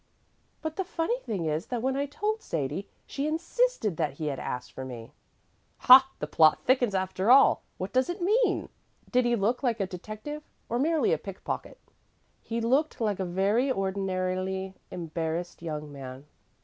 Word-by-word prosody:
"But 315 0 -4
the 385 - 0
funny 360 +7 -1
thing 200 - -3
is 155 +1 -1
that 245 -2 -3
when 265 0 +1
I 280 +1 -1
told 425 +9 -2
Sadie, 155 +6 -3 0.2
she 280 +1 -3
insisted 330 - 0
that 155 -4 0
he 155 +3 -5
had 135 - -6
asked 125 - -5
for 130 - -7
me." 120 -3 -8 0.6
"Ha! 260 +1 +8
The - - -3
plot 155 -1 +5
thickens, 245 -5 +3
after 190 +2 0
all. 270 +2 +7 0.2
What 185 +2 -5
does 255 +5 +2
it 350 +3 -3
mean? 425 +8 +2 0.4
Did 250 -1 +3
he 240 0 +3
look 230 +3 0
like 240 -4 0
a 195 - +1
detective, 215 +11 -7 0.3
or 240 - 0
merely 310 - +2
a 155 - 0
pickpocket?" 195 +1 -6 0.6
"He 230 0 -3
looked 270 +7 +1
like 210 -4 0
a - - 0
very 200 +9 +1
ordinarily 190 -1 -2 0.2
embarrassed 165 0 -4
young 150 -3 -5
man." 135 -1 -9
205 Hz, 170 wpm, -28 LUFS, 175-270 Hz, 0.6 s, Ha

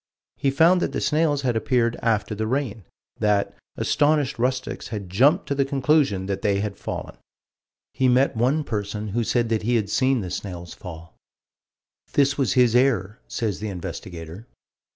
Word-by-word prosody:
He 140 - +1
found 165 +6 +4
that - - -1
the - - -1
snails 150 -2 +1
had 125 -3 +1
appeared 115 +1 +1
after 110 -2 0
the 110 +1 -2
rain: 120 -6 -2 0.3
that 105 -1 +1 0.2
"astonished 145 -4 +1
rustics 130 +2 -2
had 100 -5 -6
jumped 145 - +4
to - - -1
the 140 0 +2
conclusion 135 -7 +1
that 100 0 -3
they 100 -1 +1
had 100 -1 -3
fallen." - - -6 0.8
He 130 0 +2
met 130 +2 +3
one 130 +7 +1
person 105 -3 -4
who 115 +4 0
said 120 0 0
that 110 -1 +1
he 120 +3 +1
had 105 -3 0
seen 130 -2 +2
the 90 -2 -5
snails 90 -3 -6
fall. 85 -4 -10 1.0
"This 140 0 +3
was 135 -3 +1
his 125 -2 +4
error," 120 -4 +2
says 110 -5 -2
the 105 0 -4
investigator. 90 +1 -7
115 Hz, 170 wpm, -24 LUFS, 100-135 Hz, 1.0 s, found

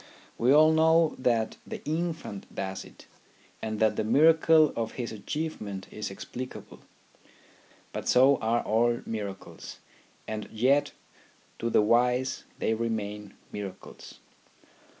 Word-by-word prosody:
We 120 +3 +2
all 155 +2 +7
know 160 0 +4
that 115 -3 +1
the - - -8
infant 160 - -3
does 95 0 -4
it, - - -16 0.6
and 110 -1 -3
that 110 -1 +2
the - - +1
miracle 155 +5 +5
of 115 -1 -3
his 120 -2 -4
achievement 105 -4 -5
is 105 - -5
explic 125 +6 -7
able. - - -11 1.1
But - - -5
so 135 +3 +6
are 115 +2 0
all 120 +2 +1
miracles, 100 -3 -7 0.5
and 110 -1 -5
yet 135 +6 +2 0.7
to 115 - -1
the 110 - +4
wise 125 +3 +2
they 110 - 0
remain 105 -2 -4 0.2
miracles. 100 -2 -8
115 Hz, 125 wpm, -28 LUFS, 105-145 Hz, 1.1 s, all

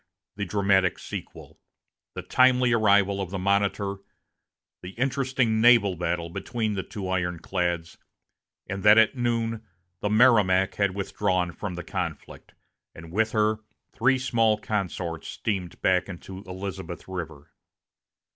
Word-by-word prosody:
the 100 0 -3
dramatic 100 -3 +2
sequel - - -9 0.6
the - - -5
timely 125 -1 +4
arrival 100 -3 +3
of 95 - -4
the 95 - -4
Monitor, 100 +1 0 0.8
the 90 +2 -9
interesting 130 -3 0
naval 115 -5 +5
battle 85 0 -2
between 110 +5 -3
the 95 - -2
two 95 +1 -7
ironclads, 90 -1 -2 0.7
and 95 0 -4
that 105 +2 +7
at 110 +4 +5
noon 115 -2 -1 0.4
the 105 - -1
Merrimac 105 -5 +4
had 100 -2 0
withdrawn 95 -2 -1
from 95 0 -6
the 90 - -6
conflict, - - -6 0.4
and 80 0 -11
with 110 +4 +1
her 110 0 +2 0.3
three 125 +3 +3
small 115 -4 +2
consorts 90 -6 -3
steamed 95 -6 -4
back 95 0 +2
into 95 +1 -8
Elizabeth 95 -1 -7
River. 85 -6 -7
100 Hz, 125 wpm, -26 LUFS, 90-110 Hz, 0.8 s, that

